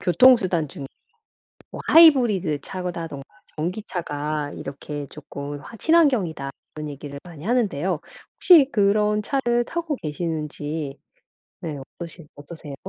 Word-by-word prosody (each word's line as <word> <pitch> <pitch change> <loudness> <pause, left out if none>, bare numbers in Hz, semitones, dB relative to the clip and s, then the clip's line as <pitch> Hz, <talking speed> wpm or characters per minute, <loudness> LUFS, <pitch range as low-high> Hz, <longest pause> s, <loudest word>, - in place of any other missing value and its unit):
'교통수단 185 - +4
중에 135 0 -8 0.9
뭐 - - -7
하이브리드 230 - +6
차라던가 170 -6 -5 0.3
전기차가 155 -4 -3
이렇게 145 +1 -6
조금 145 0 -7
화 230 - -11
친환경이다.' 225 - +2 0.2
이런 150 -1 -5
얘기를 140 0 -8
많이 170 -2 -11
하는데요. 190 - 0 0.4
혹시 310 -7 +7
그런 210 0 +2 0.2
차를 240 0 +2
타고 325 0 -3
계시는지 150 - -4 0.6
네 155 -3 -4 0.2
어떠시 170 -2 -9
어떠세요? 145 -1 -9
170 Hz, 290 characters per minute, -23 LUFS, 145-215 Hz, 0.9 s, 혹시